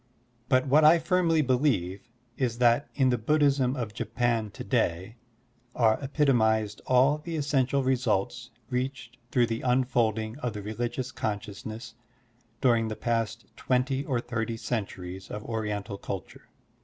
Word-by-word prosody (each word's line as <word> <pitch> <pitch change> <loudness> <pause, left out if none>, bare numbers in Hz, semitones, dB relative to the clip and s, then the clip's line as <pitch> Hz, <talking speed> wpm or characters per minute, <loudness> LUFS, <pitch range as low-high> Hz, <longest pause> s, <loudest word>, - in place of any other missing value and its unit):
But 130 -1 +3
what 145 +3 +4
I 155 +3 +8
firmly 165 -1 +2
believe 120 - 0 0.3
is 120 -3 -1
that 120 +3 +3
in 135 -3 +3
the 125 -2 +1
Buddhism 140 0 +2
of 115 -5 -4
Japan 115 -1 -1
to - - -8
day 95 +8 -1 0.6
are 110 -2 +3
epitomized 110 -7 +2
all 130 +4 +4
the 165 +2 -6
essential 140 -2 +1
results 125 -1 0 0.2
reached 125 -1 -3
through 120 -1 +3
the 115 0 -3
unfolding 120 -2 +1
of 125 -6 -3
the 105 -1 -6
religious 120 +4 -3
conscious 105 0 -4
ness 110 +1 -7 0.7
during 115 -3 +3
the 110 - -4
past 115 -1 -2
twenty 130 +2 0
or 130 -4 -1
thirty 115 -1 -3
centuries 95 -5 -5
of 105 0 -6
Oriental 105 -3 -3
culture. 95 -4 -7
120 Hz, 140 wpm, -28 LUFS, 110-130 Hz, 0.7 s, I